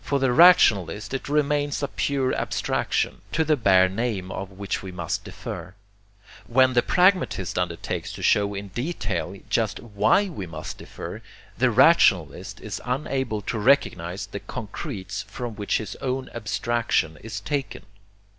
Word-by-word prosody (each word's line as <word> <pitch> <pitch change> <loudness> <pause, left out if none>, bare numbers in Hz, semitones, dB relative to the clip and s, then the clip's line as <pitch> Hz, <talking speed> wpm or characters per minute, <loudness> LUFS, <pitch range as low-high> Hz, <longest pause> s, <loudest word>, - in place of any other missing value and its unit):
For 140 - 0
the 135 -2 +2
rationalist 105 - +5
it 135 - -4
remains 145 -1 +1
a - - +1
pure 135 -2 0
abstraction, - - -1
to 160 - +2
the 155 0 +3
bare 95 -7 +5
name 95 -2 -3
of 95 0 -5
which 100 0 -4
we 95 - -7
must 85 -2 -3
defer. 90 +3 -8 0.7
When 130 +1 +4
the 120 - +4
pragmatist 180 - +2
undertakes 85 -2 -3
to - - -8
show 100 0 +3
in 100 0 -6
detail 130 - -3
just - - 0
WHY 110 - +2
we 105 - -6
must 80 -2 -7
defer, - - -8 0.3
the - - +3
rationalist - - +4
is - - -5
unable 130 -4 -2
to 110 - -3
recognize 100 -7 +1
the 100 0 -7
concretes 105 - -6
from 120 -2 -6
which 105 -1 -1
his 105 -3 -6
own 130 0 -3
abstraction 115 -7 -1
is 110 -1 -5
taken. 140 +5 -3
115 Hz, 145 wpm, -24 LUFS, 95-135 Hz, 0.7 s, rationalist